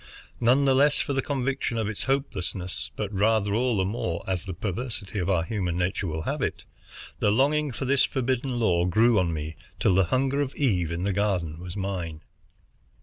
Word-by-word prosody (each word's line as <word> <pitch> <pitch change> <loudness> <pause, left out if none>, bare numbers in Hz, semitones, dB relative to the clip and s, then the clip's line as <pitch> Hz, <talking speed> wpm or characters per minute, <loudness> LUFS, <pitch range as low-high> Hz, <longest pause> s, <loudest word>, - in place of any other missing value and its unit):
None 125 +4 +4
the 135 - +5
less 145 +2 +4
for 140 - -1
the 135 - +1
conviction 135 -3 -1
of 110 -2 0
its 110 -1 -4
hopelessness, 95 -9 -2
but 105 -1 -3
rather 105 0 +2
all 120 0 +1
the 95 - +2
more, 95 -5 -2
as 95 -2 -1
the 95 - -4
perversity 105 +1 -4
of 90 +1 -1
our 90 -4 +2
human 90 -2 -2
nature 95 +2 -1
will 80 -1 -3
have - - -2
it, - - -2 0.6
the - - +3
longing 140 +6 +2
for 120 +3 -4
this 135 +1 +3
forbidden 130 -1 -1
lore 90 -5 +2
grew 110 +3 +4
on 90 -2 +1
me, 80 0 -4 0.2
till 110 -6 +3
the 95 0 +4
hunger 135 +8 +1
of 140 -1 -3
Eve 90 - +1
in 85 +2 -2
the 100 0 0
Garden 90 -6 0
was 90 +2 -7
mine. 90 -5 -3
105 Hz, 200 wpm, -26 LUFS, 90-130 Hz, 0.6 s, the